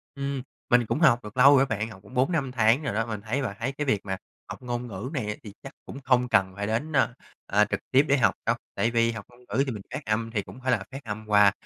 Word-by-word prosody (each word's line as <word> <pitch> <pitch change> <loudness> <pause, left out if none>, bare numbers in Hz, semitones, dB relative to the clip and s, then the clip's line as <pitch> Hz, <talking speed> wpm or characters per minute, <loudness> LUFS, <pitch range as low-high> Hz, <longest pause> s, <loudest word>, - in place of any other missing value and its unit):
Ừm, 140 -1 -3 0.3
mình 120 -1 +4
cũng 145 - -1
học 130 -8 +5
được 105 +4 -10
lâu 140 +2 +8
rồi 135 - +5
bạn, 110 -2 -2
học 100 -3 -12
cũng 100 - -15
4-5 135 0 +1
tháng 120 +4 +3
rồi 135 - -2
đó. 110 +1 0
Mình 110 -3 -5
thấy 120 +6 -2
bạn 105 -6 -3
thấy 130 +4 -1
cái 150 +2 -4
việc 105 -7 +1
mà 95 -1 -2 0.3
học - - -7
ngôn 120 0 -4
ngữ 105 +4 -6
này 120 -7 -2
á 105 - -1
thì 105 -2 -9
chắc 135 - -9
cũng 135 - -8
không 125 -1 +3
cần 95 -4 +2
phải 100 0 -3
đến, 125 +9 -1
ơ, 130 -2 +3 0.3
ơ, 105 +1 +3
trực - - -1
tiếp 135 +3 +5
để 140 0 +4
học 105 -6 +3
đâu. - - +2 0.2
Tại 115 - +1
vì 115 0 +2
học 115 -3 -7
ngôn 120 0 -20
ngữ 130 +7 +2
thì 130 - -3
mình 105 -3 -6
phát 145 - -5
âm 115 +1 -1
thì 105 -3 0
cũng 125 - -12
phải 130 0 0
là 105 -5 +1
phát 135 +1 -8
âm 110 -1 -6
qua, 105 -1 +6
120 Hz, 290 wpm, -26 LUFS, 105-135 Hz, 0.3 s, lâu